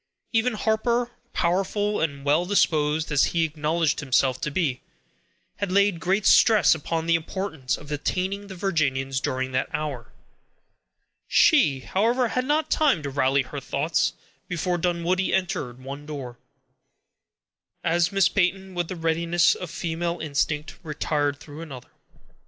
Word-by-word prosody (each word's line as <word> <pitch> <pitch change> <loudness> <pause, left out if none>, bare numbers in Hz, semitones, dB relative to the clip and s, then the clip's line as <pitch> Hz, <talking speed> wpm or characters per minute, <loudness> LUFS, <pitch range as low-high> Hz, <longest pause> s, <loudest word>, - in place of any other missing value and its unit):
Even 225 +2 +2
Harper, 235 +3 0 0.2
powerful 195 +4 0
and 140 -3 -2
well 150 +4 +3
disposed 155 -5 +1
as 145 -1 +4
he 165 - +4
acknowledged 155 0 0
himself 130 -2 +1
to - - -1
be, 140 -5 -1 0.8
had 200 -2 -2
laid 200 -2 +3
great 190 +4 0
stress 220 -2 +6
upon 160 +1 -3
the 170 - +2
importance 165 -4 -2
of 145 - -13
detaining 185 +7 -2
the 190 - -8
Virginians 135 -8 0
during 130 0 -2
that 130 0 -1
hour. 145 -6 -4 1.2
She, 150 - +4
however, 235 - +1
had 255 +2 -1
not 300 +3 0
time 280 - +3
to 140 - -4
rally 135 0 +2
her 145 +2 -7
thoughts, 145 +4 0 0.3
before 175 0 -1
Dunwoodie 180 +2 0
entered 150 -10 -2
one 140 +3 -8
door, 130 -5 -7 1.4
as 170 +2 +2
Miss 195 -2 +4
Peyton, 190 0 0
with 175 -2 -2
the 185 - -5
readiness 170 +1 +2
of 180 - -7
female 170 +1 -3
instinct, 150 0 -2
retired 145 -2 -1
through 145 +1 -10
another. 135 -7 -10
165 Hz, 140 wpm, -25 LUFS, 145-190 Hz, 1.4 s, stress